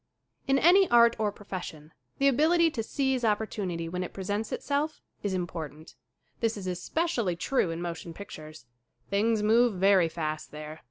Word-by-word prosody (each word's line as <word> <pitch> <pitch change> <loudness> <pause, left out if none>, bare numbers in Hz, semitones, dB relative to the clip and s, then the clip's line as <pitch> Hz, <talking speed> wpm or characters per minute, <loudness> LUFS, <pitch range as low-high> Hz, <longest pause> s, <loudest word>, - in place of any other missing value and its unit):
IN 270 0 +4
ANY 360 +6 +5
ART 235 -1 +6
or 210 -1 +1
profession 175 -6 -8 0.2
the 275 - +3
ability 325 +5 +4
to 235 - -3
seize 265 +2 -1
opportunity 205 -6 -1
when 180 +2 -3
it 180 - -7
presents 205 +3 -3
itself 295 +2 -2 0.2
is 200 -2 -1
impor 175 -4 -3
tant. 155 +3 -15 0.5
This 230 -1 0
is 195 - -7
especially 200 - -1
true 190 +2 0
in 165 +1 -4
motion 170 0 -5
pictures. 155 -7 -10 0.5
Things 215 +2 +2
move 230 +1 +4
very 185 -2 +4
fast 155 -2 -4
there. 155 +1 -8
200 Hz, 160 wpm, -28 LUFS, 170-240 Hz, 0.5 s, ART